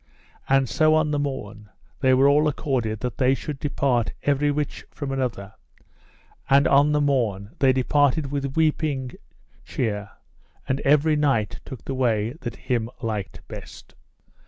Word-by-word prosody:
And 135 Hz, -1 st, +3 dB
so 155 Hz, +5 st, +3 dB
on 155 Hz, -1 st, +2 dB
the 145 Hz, -, 0 dB
morn 110 Hz, -7 st, -5 dB, 0.3 s
they 130 Hz, -3 st, +4 dB
were 135 Hz, +2 st, +5 dB
all 150 Hz, +2 st, +4 dB
accorded 125 Hz, -7 st, -1 dB
that 125 Hz, +2 st, -4 dB
they 130 Hz, 0 st, +4 dB
should 145 Hz, 0 st, -6 dB
depart 135 Hz, -5 st, 0 dB
everych 145 Hz, +1 st, 0 dB
from 140 Hz, -3 st, -6 dB
other; 120 Hz, -7 st, -3 dB, 1.0 s
and 140 Hz, +1 st, +5 dB
on 140 Hz, +2 st, +4 dB
the 150 Hz, -, +2 dB
morn 115 Hz, -9 st, 0 dB
they 135 Hz, -1 st, +5 dB
departed 140 Hz, +2 st, +1 dB
with 140 Hz, -1 st, -3 dB
weeping 150 Hz, -5 st, 0 dB, 0.5 s
cheer, 105 Hz, -, -3 dB, 0.6 s
and 130 Hz, -, 0 dB
every 150 Hz, +2 st, +3 dB
knight 140 Hz, -8 st, 0 dB
took 130 Hz, -6 st, -9 dB
the 135 Hz, -, -3 dB
way 115 Hz, -4 st, +1 dB
that 120 Hz, -3 st, -5 dB
him 115 Hz, -3 st, -2 dB
liked 105 Hz, -4 st, -4 dB
best. -, -, -11 dB
135 Hz, 145 wpm, -24 LUFS, 115-145 Hz, 1.0 s, were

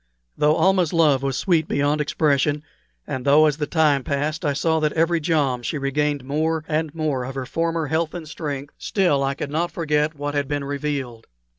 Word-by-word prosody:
Though 150 Hz, +1 st, +3 dB
Almah's 185 Hz, -4 st, +2 dB
love 150 Hz, -5 st, +4 dB
was 135 Hz, -1 st, -1 dB
sweet 165 Hz, -4 st, +1 dB
beyond 145 Hz, +2 st, +1 dB
expression, 150 Hz, 0 st, +1 dB, 0.4 s
and 130 Hz, -, -4 dB
though 145 Hz, +3 st, +5 dB
as 150 Hz, -2 st, +1 dB
the 150 Hz, -2 st, -2 dB
time 150 Hz, -5 st, +2 dB
passed 150 Hz, +5 st, -2 dB
I 145 Hz, -2 st, +1 dB
saw 160 Hz, +3 st, +1 dB
that 150 Hz, -1 st, 0 dB
every 165 Hz, +1 st, +2 dB
jom 150 Hz, -6 st, 0 dB
she 120 Hz, +6 st, -3 dB
regained 145 Hz, 0 st, -1 dB
more 155 Hz, +3 st, -1 dB
and 155 Hz, 0 st, -1 dB
more 150 Hz, -5 st, -1 dB
of 130 Hz, +2 st, -6 dB
her 135 Hz, -1 st, -3 dB
former 165 Hz, +3 st, -1 dB
health 160 Hz, +3 st, -1 dB
and 165 Hz, -3 st, -6 dB
strength, 145 Hz, -2 st, -5 dB
still 175 Hz, -9 st, +1 dB
I 135 Hz, 0 st, -1 dB
could 140 Hz, -, -5 dB
not 170 Hz, +3 st, 0 dB
forget 150 Hz, -2 st, 0 dB
what 145 Hz, 0 st, -4 dB
had 145 Hz, -1 st, -1 dB
been 145 Hz, 0 st, -2 dB
revealed. 140 Hz, -5 st, -4 dB
150 Hz, 195 wpm, -22 LUFS, 140-160 Hz, 0.4 s, though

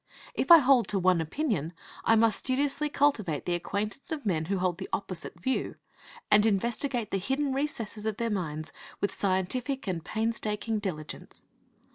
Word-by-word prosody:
If -, -, -2 dB
I 340 Hz, -, +12 dB
hold 270 Hz, -5 st, +4 dB
to 205 Hz, -, +1 dB
one 185 Hz, -2 st, +3 dB
opinion, 170 Hz, -, -2 dB, 0.3 s
I 225 Hz, -, +5 dB
must 225 Hz, 0 st, +4 dB
studiously 280 Hz, +3 st, 0 dB
cultivate 220 Hz, -, +1 dB
the 175 Hz, -, 0 dB
acquaintance 205 Hz, -, -3 dB
of 300 Hz, -5 st, -4 dB
men 165 Hz, -6 st, 0 dB
who 195 Hz, +3 st, -1 dB
hold 180 Hz, -1 st, 0 dB
the 190 Hz, -, -6 dB
opposite 185 Hz, -3 st, -4 dB
view, 260 Hz, +9 st, -1 dB, 0.6 s
and 210 Hz, 0 st, +7 dB
investigate 230 Hz, +3 st, 0 dB
the 195 Hz, -, 0 dB
hidden 270 Hz, +7 st, -1 dB
recesses 230 Hz, -6 st, -3 dB
of 215 Hz, -1 st, -2 dB
their 230 Hz, -1 st, -1 dB
minds 155 Hz, -5 st, -3 dB, 0.3 s
with 200 Hz, -, -1 dB
scientific 235 Hz, +8 st, -1 dB
and 175 Hz, -5 st, -2 dB
painstaking 220 Hz, 0 st, -1 dB
diligence. 155 Hz, -7 st, -6 dB
215 Hz, 160 wpm, -29 LUFS, 185-260 Hz, 0.6 s, I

